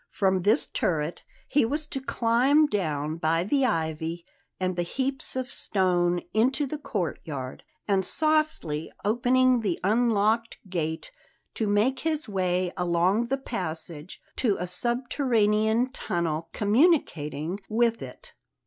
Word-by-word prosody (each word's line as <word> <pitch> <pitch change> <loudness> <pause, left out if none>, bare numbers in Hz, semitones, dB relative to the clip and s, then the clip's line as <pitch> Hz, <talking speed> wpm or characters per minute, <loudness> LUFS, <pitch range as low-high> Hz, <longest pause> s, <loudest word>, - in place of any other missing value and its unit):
From 190 -2 +1
this 205 +4 +3
turret 160 -1 -2 0.3
he 290 - +3
was 295 +7 -1
to 275 -2 -5
climb 260 +5 +3
down 155 - -2
by 165 +1 +1
the 275 +8 +1
ivy 160 -3 -2 0.3
and 185 -1 -1
the 175 - 0
heaps 265 +11 -2
of 260 -1 -2
stone 180 -7 +1
into 260 +7 +2
the 295 +2 -5
courtyard; 155 - -4 0.2
and, 195 -2 +2
softly 305 - 0
opening 250 +3 +3
the 200 -6 -1
unlocked 225 +1 +2
gate, 160 - -3 0.4
to 220 - -1
make 215 +6 +2
his 315 -2 -1
way 185 -2 0
along 180 +5 +1
the 270 +2 0
passage 165 - -6 0.2
to 220 -6 +2
a 180 - -2
subterranean 230 - +1
tunnel 165 - -2
communicating 205 - +1
with 230 +1 +1
it. - - -10
205 Hz, 125 wpm, -26 LUFS, 175-255 Hz, 0.4 s, this